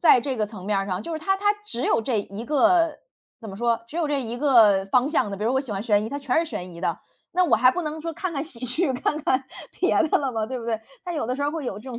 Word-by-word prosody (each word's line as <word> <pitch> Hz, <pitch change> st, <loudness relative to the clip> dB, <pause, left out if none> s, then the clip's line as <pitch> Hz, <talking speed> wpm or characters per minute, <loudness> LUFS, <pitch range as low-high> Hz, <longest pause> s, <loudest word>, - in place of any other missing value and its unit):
在 305 Hz, -7 st, +6 dB
这 260 Hz, +1 st, -3 dB
个 215 Hz, -2 st, 0 dB
层 205 Hz, -4 st, -10 dB
面 205 Hz, 0 st, +1 dB
儿 195 Hz, -, -2 dB
上， 185 Hz, 0 st, -3 dB
就 335 Hz, -, -6 dB
是 315 Hz, -, -2 dB
它 385 Hz, +4 st, +1 dB
它 410 Hz, +1 st, +2 dB
只 250 Hz, -, -4 dB
有 -, -, +2 dB
这 225 Hz, -1 st, 0 dB
一 200 Hz, +3 st, -8 dB
个， 310 Hz, +4 st, +3 dB, 0.4 s
怎 220 Hz, -3 st, -8 dB
么 195 Hz, -, -8 dB
说， 235 Hz, 0 st, 0 dB
只 305 Hz, -, -8 dB
有 335 Hz, -3 st, +1 dB
这 285 Hz, -2 st, 0 dB
一 235 Hz, 0 st, -5 dB
个 220 Hz, -9 st, +5 dB
方 250 Hz, +6 st, +3 dB
向 300 Hz, -8 st, +1 dB
的。 200 Hz, -, -4 dB
比 200 Hz, -, -6 dB
如 235 Hz, -, +2 dB
我 265 Hz, -, +3 dB
喜 265 Hz, -6 st, -6 dB
欢 195 Hz, 0 st, -3 dB
悬 210 Hz, -2 st, +2 dB
疑， -, -, -4 dB
它 280 Hz, -, -4 dB
全 275 Hz, 0 st, +1 dB
是 330 Hz, 0 st, 0 dB
悬 185 Hz, -7 st, -6 dB
疑 170 Hz, -, -10 dB
的。 -, -, -1 dB, 0.3 s
那 365 Hz, 0 st, +4 dB
我 235 Hz, -9 st, +4 dB
还 255 Hz, +3 st, +6 dB
不 360 Hz, -, -2 dB
能 310 Hz, 0 st, -4 dB
说 330 Hz, +1 st, -4 dB
看 365 Hz, +2 st, -4 dB
看 280 Hz, -1 st, -2 dB
喜 255 Hz, -6 st, -7 dB
剧， 265 Hz, +5 st, 0 dB
看 295 Hz, +4 st, -1 dB
看 260 Hz, +1 st, +2 dB, 0.4 s
别 -, -, +3 dB
的 -, -, +2 dB
了 275 Hz, -2 st, -1 dB
吧。 220 Hz, -3 st, -2 dB
对 255 Hz, +2 st, -4 dB
不 -, -, -8 dB
对？ 225 Hz, -2 st, -1 dB, 0.2 s
它 355 Hz, -, -4 dB
有 295 Hz, -8 st, -2 dB
的 250 Hz, -, -1 dB
时 280 Hz, -, -3 dB
候 285 Hz, -, +1 dB
儿 -, -, -1 dB
会 315 Hz, -2 st, -4 dB
有 200 Hz, -, -4 dB
这 265 Hz, -, -10 dB
种 235 Hz, -, -6 dB
255 Hz, 345 characters per minute, -24 LUFS, 220-305 Hz, 0.4 s, 在